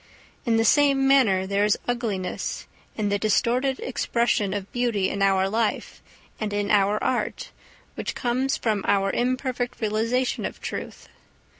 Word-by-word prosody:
In 230 -1 +3
the 225 - +2
same 275 +1 +4
manner 220 -9 +4
there 200 +1 +1
is 210 0 +3
ugliness 225 -7 -3 0.3
in 210 -2 0
the 205 0 0
distorted 245 +5 +1
expression 235 -5 0
of 200 -1 -4
beauty 235 -6 0
in 200 - -3
our 195 -1 +3
life 220 +2 -2 0.4
and 215 -2 -2
in 205 0 -1
our 205 0 +3
art 255 - -2 0.4
which - - -4
comes 255 +2 0
from 215 -4 -1
our 195 -1 +2
imperfect 250 0 -2
realisation 230 +4 0
of - - -5
Truth. - - -6
220 Hz, 145 wpm, -24 LUFS, 200-245 Hz, 0.4 s, same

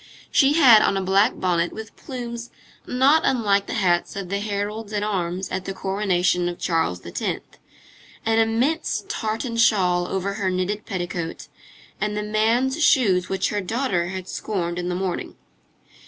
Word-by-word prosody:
She 275 0 +4
had 255 -9 +7
on 195 - +2
a - - 0
black 195 +5 +3
bonnet 175 -2 +1
with 220 0 -9
plumes 240 -2 -7 0.4
not 275 +5 +4
unlike 200 -5 +2
the - - -3
hats 180 -5 +1
of 195 -2 -5
the 200 +1 -1
heralds 210 +1 -3
at 205 0 -1
arms 185 -2 -2
at 185 0 -4
the 195 - -5
coronation 185 -3 0
of 175 - -6
Charles 160 - -1
X., 85 - -5 1.0
an 225 0 +3
immense 240 +9 +1
tartan 225 +2 -3
shawl 180 -6 +3
over 195 +1 -2
her 190 - +1
knitted 185 +3 -2
petticoat, 175 -3 -4 0.5
and 210 0 -1
the 210 - -2
man's 235 +8 +1
shoes 195 -12 +3
which 190 -1 0
her 205 -1 -1
daughter 200 -4 -1
had 185 0 -6
scorned 175 -5 -3
in 175 0 -3
the 180 - -1
morning. 185 -1 -3
200 Hz, 160 wpm, -23 LUFS, 180-225 Hz, 1.0 s, had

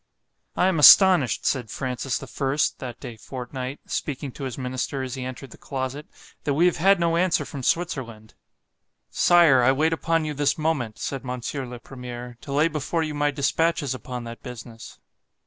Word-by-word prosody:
I - - +2
am 185 -4 +2
astonished, 180 - +7
said 125 -5 0
Francis 130 +2 -3
the - - -8
First, 140 +1 -1
(that 120 -2 -7
day 120 - -8
fortnight) 130 +3 -6
speaking 140 -1 -4
to 135 - -7
his 130 - -5
minister 130 +1 -3
as 130 -2 -5
he 130 -1 -5
entered 130 0 -7
the - - -14
closet, 135 +2 -5 0.4
that 145 - 0
we 170 +4 +4
have 180 - +2
had 195 +3 +4
no 170 -1 +1
answer 180 0 +1
from 140 - -7
Switzerland.——Sire, 135 +2 0
I 125 +2 +5
wait 155 +4 +1
upon 165 0 0
you 150 - -3
this 145 0 +1
moment, 145 -9 -1
said 135 +2 -4
Mons. 125 -2 -5
le 130 -4 -5
Premier, 125 -1 -9
to 140 - -9
lay 150 +3 +3
before 160 +1 -2
you 155 -1 -3
my 145 0 +1
dispatches 145 +1 0
upon 125 -1 -6
that 115 0 -9
business. 120 -2 -10
135 Hz, 180 wpm, -24 LUFS, 125-155 Hz, 0.4 s, astonished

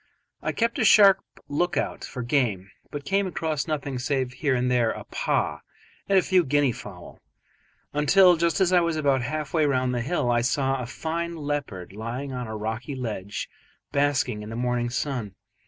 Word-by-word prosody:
I - - -1
kept 230 0 0
a - - +3
sharp 200 -2 +7 0.3
look 175 +5 0
out - - -2
for 125 - -5
game, 115 -7 0 0.2
but 145 -1 -6
came 195 +2 +1
across 160 -4 -2
nothing 140 -4 -2
save 130 -1 -1
here 140 0 0
and 125 0 +1
there 120 -2 +3
a - - -4
paa - - -1 0.5
and 195 - +5
a 185 - +5
few 185 -2 +3
guinea 145 -2 +2
fowl, 95 -6 -10 0.7
until, 180 +5 +6
just 170 -2 +1
as 185 -1 +3
I 180 - +7
was 170 -1 0
about 140 -4 +2
half 150 +3 -4
way 160 -2 +3
round 130 -2 +1
the 120 - -1
hill, 125 -2 0
I 120 0 +3
saw 135 +2 0
a 120 - -5
fine 170 +5 -3
leopard 145 - -4
lying 120 +6 -5
on 125 -2 -4
a 110 0 -5
rocky 110 +6 -4
ledge 105 -6 -4 0.4
basking 140 -5 +1
in 105 - -8
the 115 - -6
morning 120 0 0
sun. 120 -6 -3
135 Hz, 190 wpm, -25 LUFS, 120-160 Hz, 0.7 s, sharp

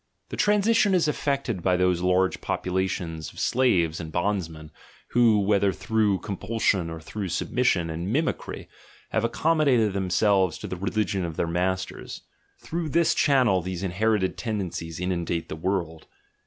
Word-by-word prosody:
The - - -5
transition 210 -1 +3
is 170 -3 +2
effected 140 -9 -1
by 90 +1 +2
those 90 -1 +2
large 90 +1 +1
populations 90 -3 -2
of - - -12
slaves 90 -11 +2
and 80 -2 -6
bondsmen, 85 -4 -2 0.4
who, 115 -3 +4
whether 100 -1 +2
through 105 -1 0
compulsion 100 -3 -1
or 80 0 -6
through 100 +5 -5
submission 90 -1 0
and 85 +5 -4
"mimi 155 +6 +2
cry" - - -9 0.4
have 110 - 0
accommodated 125 -4 +2
themselves 95 -1 +2
to - - -8
the - - -4
religion 95 +1 -1
of 85 -2 -5
their - - +1
masters; 90 +2 -3 0.4
through 165 -1 -4
this 170 +2 +3
channel 125 -10 +3
these 90 +1 -5
inherited 100 +1 0
tendencies 90 -7 -4
inundate 85 -2 -2
the - - -4
world. 80 -2 -3
95 Hz, 145 wpm, -25 LUFS, 85-115 Hz, 0.4 s, who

